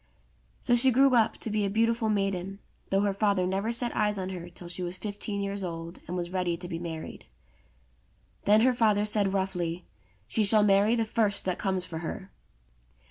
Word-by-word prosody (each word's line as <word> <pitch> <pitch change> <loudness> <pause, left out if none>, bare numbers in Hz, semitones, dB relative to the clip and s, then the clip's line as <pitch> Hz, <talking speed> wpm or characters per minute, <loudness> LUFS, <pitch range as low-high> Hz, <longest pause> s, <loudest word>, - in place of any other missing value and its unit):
So 240 - +3
she 250 +2 +4
grew 265 +2 +4
up 230 -2 +3
to 220 - -4
be 210 0 +1
a 200 - 0
beautiful 230 +2 +1
maiden, 195 -2 -1 0.3
though 195 0 +2
her 200 -1 +1
father 200 -2 +1
never 195 +5 -1
set 235 0 -1
eyes 210 -1 +1
on 185 -1 -3
her 175 -2 -7
till 175 0 -11
she 175 +1 -3
was 180 +1 -3
fifteen 205 0 -4
years 200 0 -3
old 165 0 -6
and 180 - -3
was 175 0 -3
ready 180 -2 -1
to 180 +1 -7
be 165 -2 -4
married. 165 -2 -7 1.2
Then 210 +2 +5
her 255 +2 +4
father 215 -3 +2
said 210 -2 +1
roughly, 180 -3 -2 0.4
"She 215 - +1
shall 210 +1 +5
marry 205 +3 +4
the 225 -1 +1
first 215 -2 0
that 185 -1 -1
comes 190 -2 0
for 160 -3 -6
her." 180 +3 -6
200 Hz, 195 wpm, -28 LUFS, 180-215 Hz, 1.2 s, Then